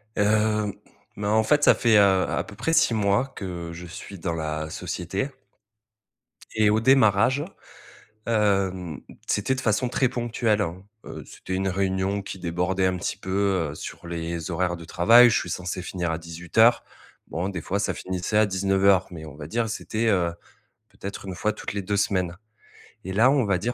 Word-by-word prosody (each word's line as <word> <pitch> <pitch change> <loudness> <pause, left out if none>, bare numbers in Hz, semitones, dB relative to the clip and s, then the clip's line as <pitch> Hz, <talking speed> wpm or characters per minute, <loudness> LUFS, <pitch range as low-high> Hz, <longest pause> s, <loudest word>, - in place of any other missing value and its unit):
Hem, 105 0 +1 0.4
bah, 105 0 -2
en 110 +1 +3
fait, 145 +5 +2
ça - - +7
fait, 115 -3 +4
heu, 105 - +7
à 95 -2 +2
peu - - -12
près 165 - -1
6 165 -7 +4
mois 105 +4 +2
que 85 -3 -6
je 90 +1 -8
suis 90 +2 -9
dans 85 -1 -2
la 80 -1 -3
société 95 - -3 1.3
et 110 -1 +4
au 110 +1 +3
démarrage, 130 +1 +4 0.8
hem, 95 - 0 0.3
c'était 120 +6 0
de 130 - -4
façon 115 +3 +1
très 130 0 +1
ponctuelle. 115 -3 0 0.4
Heu, - - -8
c'était 95 - -8
une 95 +1 0
réunion 95 +1 -1
qui 95 -1 -8
débordait 90 +2 -1
un 90 - -1
petit 85 - -3
peu, 95 -4 0
heu, - - -9
sur 85 - -8
les 85 0 -4
horaires 90 0 -1
de 85 - -10
travail. 115 +9 +6
Je - - +2
suis 90 - -3
censé 90 +2 -4
finir 85 -2 -3
à 80 - -2
18:00. 85 +8 +2 0.4
Bon, 90 +4 -3
des 90 -4 -5
fois, 100 +5 -2
ça - - 0
finissait 95 +3 -2
à 110 - +5
19:00, 95 0 +3
mais 80 -2 -8
on 75 -2 -10
va 75 -1 -8
dire, 115 +6 -1
c'était, 115 +1 -2
heu, 90 -4 +2 0.6
peut-être 100 0 -8
une 95 - -5
fois 105 +4 0
toutes - - -6
les 100 -1 -3
2 100 +2 -1
semaines 95 -3 0 0.7
et 95 - -4
là, 120 +6 +5
on 135 -5 +2
va 100 -2 +1
dire 120 +5 -2
95 Hz, 185 wpm, -25 LUFS, 90-110 Hz, 1.3 s, ça